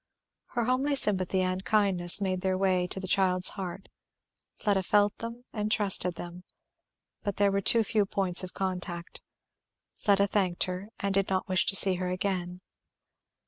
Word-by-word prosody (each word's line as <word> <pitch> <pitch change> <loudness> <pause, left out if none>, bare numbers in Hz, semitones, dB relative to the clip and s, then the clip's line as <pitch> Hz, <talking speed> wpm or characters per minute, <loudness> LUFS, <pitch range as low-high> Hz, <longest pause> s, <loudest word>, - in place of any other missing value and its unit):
Her 240 - 0
homely 265 +4 0
sympathy 190 -6 0
and 185 +1 -2
kindness 195 -4 +5
made 185 -2 -2
their 190 -1 -1
way 185 -2 0
to 190 - -5
the 190 - -6
child's 185 -1 +2
heart; 190 -1 -7 0.7
Fleda 200 -3 0
felt 205 +2 +1
them 230 +2 -8
and 210 -1 -3
trusted 195 -4 +2
them. 175 +1 -9 0.8
But 200 -2 -4
there 200 0 +2
were 200 0 -1
too 225 +4 +5
few 210 -1 0
points 190 -2 0
of 185 - -9
contact. 180 -2 -5 0.8
Fleda 200 -2 +2
thanked 190 -3 0
her, 185 +3 -6
and 200 -1 -2
did 195 0 0
not 190 -1 -2
wish 185 +1 +1
to 195 - +2
see 190 -1 +6
her 180 0 -3
again. 180 -1 -3
190 Hz, 165 wpm, -28 LUFS, 185-205 Hz, 0.8 s, see